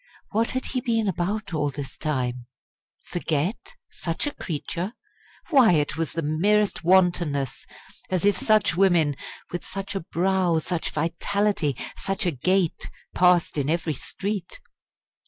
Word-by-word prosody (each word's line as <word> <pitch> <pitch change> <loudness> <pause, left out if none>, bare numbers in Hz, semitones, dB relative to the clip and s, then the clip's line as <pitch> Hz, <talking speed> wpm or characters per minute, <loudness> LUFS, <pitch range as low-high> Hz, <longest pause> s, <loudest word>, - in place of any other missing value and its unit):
What 225 +2 +1
had 260 - -2
he 255 - -2
been 225 -3 +1
about 195 +2 -2
all 150 -2 +1
this 140 -2 -7
time? 125 -5 -2 0.6
Forget? 175 - -2 0.2
such 165 - -2
a 290 - -2
creature? 175 +5 -4 0.6
Why, 255 - +7
it 150 -2 +1
was 165 -1 -2
the 165 - -2
merest 200 +8 +2
wantonness! 175 -7 +2 0.4
As 185 0 0
if 205 -1 +5
such 215 -2 +3
women 170 -6 +4 0.4
with 175 - -4
such 195 0 -5
a 195 - -1
brow, 180 0 +1
such 165 +1 -2
vitality, 170 - 0 0.2
such 195 +1 -2
a 175 - +2
gait 175 +5 0 0.2
passed 180 -4 +3
in 140 +1 0
every 165 -1 0
street! 195 +5 -4
175 Hz, 135 wpm, -25 LUFS, 155-200 Hz, 0.6 s, Why